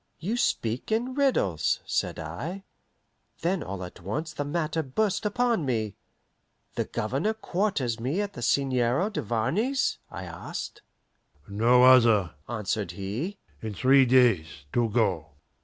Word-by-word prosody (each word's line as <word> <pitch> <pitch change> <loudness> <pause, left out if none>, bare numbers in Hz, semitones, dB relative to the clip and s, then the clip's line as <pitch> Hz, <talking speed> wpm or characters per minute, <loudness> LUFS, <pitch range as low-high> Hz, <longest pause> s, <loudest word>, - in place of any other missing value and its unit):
"You 205 +8 -2
speak 120 - -1
in 240 +4 0
riddles," 175 - +1
said - - -1
I. 140 - -5 0.8
Then 180 +2 0
all 95 0 -5
at 90 0 -10
once 150 - -4
the 145 - -3
matter 160 +2 -1
burst 195 +9 0
upon 235 -3 +1
me. 110 -6 -1 0.8
"The - - -1
Governor 210 - -1
quarters 180 - -1
me 135 +10 -1
at 205 -1 -2
the - - -8
Seigneur 130 - +1
Duvarney's?" 155 - 0
I - - -7
asked. - - -7 0.7
"No 115 +5 +4
other," 115 -9 +6 0.2
answered 105 -5 -2
he. 110 - -4 0.2
"In 110 -2 -5
three 135 +2 +5
days 110 - +3
to 120 -1 +2
go." 95 -9 0
130 Hz, 130 wpm, -27 LUFS, -, 0.8 s, other